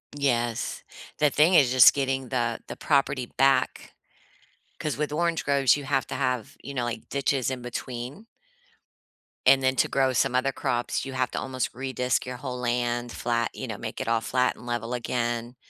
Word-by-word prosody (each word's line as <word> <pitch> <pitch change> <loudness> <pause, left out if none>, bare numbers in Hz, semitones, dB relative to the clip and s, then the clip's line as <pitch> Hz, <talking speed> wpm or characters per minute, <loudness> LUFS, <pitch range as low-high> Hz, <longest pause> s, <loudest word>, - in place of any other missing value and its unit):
Yes. 120 -5 -1 0.4
The 150 - +4
thing 155 +6 +4
is 135 -6 +5
just 130 -1 +8
getting 135 -2 -1
the 120 -3 -1
the - - -6
property 140 -3 +1
back, 135 0 +2 0.9
'cause 150 -3 -2
with 150 +1 -2
orange 170 +1 0
groves, 140 -2 +4
you 145 - -6
have 135 -1 0
to - - -4
have, 125 -4 -2
you 140 - -7
know, 125 -2 -1
like, 115 -2 -5
ditches 135 -2 0
in 130 -1 -4
between 125 - -6 1.2
and 135 +1 +6
then 130 0 +2
to - - +2
grow 135 -1 +2
some 125 +1 +1
other 130 +2 +2
crops, 120 0 -2
you 135 - -6
have 130 -1 -1
to - - -2
almost 130 -1 -2
re-disc 130 -1 -1
your 125 0 -6
whole 125 0 -5
land 120 0 -1
flat, 120 0 -1
you - - -6
know, - - -5
make - - -6
it - - -4
all 115 -1 +2
flat 125 +2 +1
and - - -14
level 120 0 -3
again, 120 0 -2
130 Hz, 185 wpm, -26 LUFS, 120-135 Hz, 1.2 s, just